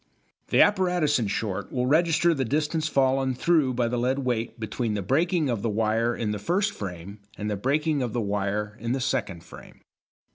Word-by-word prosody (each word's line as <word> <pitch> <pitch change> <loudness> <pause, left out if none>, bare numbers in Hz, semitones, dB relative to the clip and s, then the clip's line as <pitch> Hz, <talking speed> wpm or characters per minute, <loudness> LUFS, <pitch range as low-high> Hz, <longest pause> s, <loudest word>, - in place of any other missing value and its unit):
The - - +6
apparatus, 180 -8 +2
in 110 - -1
short, 100 -1 -3
will 125 -1 -1
register 165 +4 +3
the 135 -4 -1
distance 155 +4 -1
fallen 135 -2 +1
through 145 -3 +2
by 120 -1 +1
the 120 +1 -1
lead 130 +3 +1
weight 120 -3 -2
between 110 0 -2
the 100 - -2
breaking 160 - +1
of 120 -5 -1
the 115 - -1
wire 115 +2 +1
in 110 -2 -2
the 105 - -3
first 190 - 0
frame 95 +1 -7 0.2
and 105 0 -3
the - - 0
breaking 145 +7 0
of 120 -3 -2
the 120 - -2
wire 105 0 -2
in 115 +2 -2
the 135 - -1
second 100 -9 -2
frame. - - -14
125 Hz, 195 wpm, -26 LUFS, 105-150 Hz, 0.2 s, The